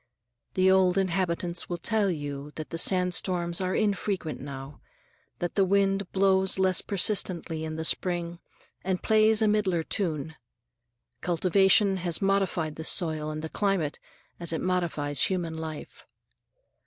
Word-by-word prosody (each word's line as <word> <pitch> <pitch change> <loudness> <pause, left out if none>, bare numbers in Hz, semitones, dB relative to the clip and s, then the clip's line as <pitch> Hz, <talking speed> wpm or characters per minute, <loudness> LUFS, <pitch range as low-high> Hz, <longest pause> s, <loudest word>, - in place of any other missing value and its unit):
The 185 0 +4
old 190 -1 +4
inhabitants 175 -2 -1
will 175 - -2
tell 215 +2 0
you 145 -3 -5
that 155 0 -7
sandstorms 180 -1 +1
are 185 0 -1
infrequent 200 -6 -1
now, 140 0 -8 0.6
that 175 - -3
the 195 - +3
wind 195 0 +1
blows 190 -1 +2
less 190 -1 +3
persistently 185 -5 -1
in 155 0 -4
the 160 0 -3
spring 175 0 0 0.4
and 185 -1 -2
plays 220 0 +4
a - - +4
milder 200 -6 +1
tune. 160 -5 -2 0.9
Cultivation 190 +3 +3
has 175 -2 -1
modified 195 -5 0
the 160 - -5
soil 155 -3 +1
and 155 0 -5
the 160 - -4
climate, 195 -7 -1 0.4
as 170 -1 -4
it 160 - -2
modifies 165 -6 0
human 175 -4 -2
life. 160 -1 -8
180 Hz, 135 wpm, -27 LUFS, 160-195 Hz, 0.9 s, The